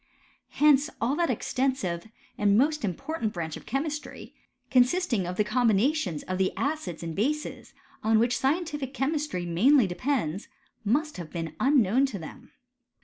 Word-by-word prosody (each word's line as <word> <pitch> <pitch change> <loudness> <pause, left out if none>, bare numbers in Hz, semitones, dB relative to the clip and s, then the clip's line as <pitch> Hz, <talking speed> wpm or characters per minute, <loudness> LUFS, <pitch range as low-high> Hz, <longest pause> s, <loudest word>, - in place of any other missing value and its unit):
Hence 295 0 +4
all 245 +5 +1
that 340 -3 +1
extensive 250 -7 -1 0.3
and 205 0 +3
most 300 +3 +2
important 225 - -3
branch 160 -3 -4
of - - -11
chemistry, 295 +4 -4 0.4
consisting 250 - +2
of 180 0 -4
the 210 - +3
com 235 +3 +2
binations 215 - +1
of 185 0 -2
the 190 - +2
acids 275 - -2
and 165 -1 -5
bases, 295 +9 -2 0.3
on 220 0 +4
which 235 +2 +2
scientific 295 -2 -1
chemistry 275 - -1
mainly 230 - +4
depends, 195 - -2 0.4
must 290 +7 0
have 170 -3 -7
been 165 -2 -4
unknown 260 -1 +3
to 220 - -5
them. 160 -4 -10
245 Hz, 145 wpm, -27 LUFS, 185-290 Hz, 0.4 s, Hence